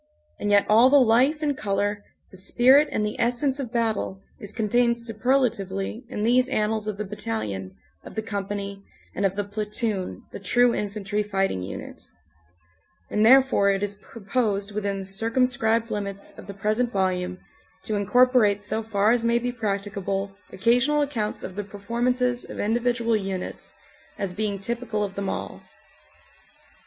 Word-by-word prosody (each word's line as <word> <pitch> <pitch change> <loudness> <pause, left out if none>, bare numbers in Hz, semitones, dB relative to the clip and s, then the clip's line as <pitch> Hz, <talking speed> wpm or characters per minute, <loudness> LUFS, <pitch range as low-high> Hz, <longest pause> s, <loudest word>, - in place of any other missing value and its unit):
And 205 - -2
yet 205 0 +5
all 230 +4 +6
the 285 +1 +7
life 260 +6 +3
and 290 -2 +1
color, 205 -1 -1 0.3
the 190 - -10
spirit 255 +9 +5
and 210 - 0
the 210 - -4
essence 250 +4 +1
of 250 -5 -4
battle 225 -5 -1 0.2
is 205 - -7
contained 235 +2 +2
super 235 +2 -1
latively 195 -4 -2
in 210 -5 -3
these 250 +3 +3
annals 215 0 0
of 210 -2 -3
the 210 - -3
battalion, 110 - -4 0.3
of - - -11
the 220 - -2
company, 200 -1 -4 0.3
and 195 - +1
of 190 - -6
the 205 - -1
platoon 210 -1 -3
the - - -7
true 245 +5 +3
infantry 205 0 -2
fighting 195 - -1
unit; 90 - -7 1.1
and 210 - +2
therefore 255 -4 +6
it 195 0 +1
is 205 0 -2
proposed 205 0 -2
within 200 -1 -2
the 195 - -5
circumscribed 230 +2 +1
limits 200 -1 -4
of - - -12
the 200 - -6
present 215 +4 0
volume 185 -2 -1 0.5
to 215 - -2
incorporate 205 0 +3
so 215 +2 -2
far 215 -1 +2
as 240 -1 +2
may 235 0 +3
be 245 +1 -1
practicable 200 -3 -3 0.2
occasional 245 +9 +3
accounts 225 -7 -3
of 185 - -7
the 205 - -3
performances 240 +5 -1
of - - -9
individual 235 +1 +1
units, 195 -3 -4 0.4
as 195 -2 -2
being 205 0 -2
typical 225 +1 -2
of 200 -1 -4
them 195 -1 -3
all. - - -5
210 Hz, 160 wpm, -25 LUFS, 200-240 Hz, 1.1 s, the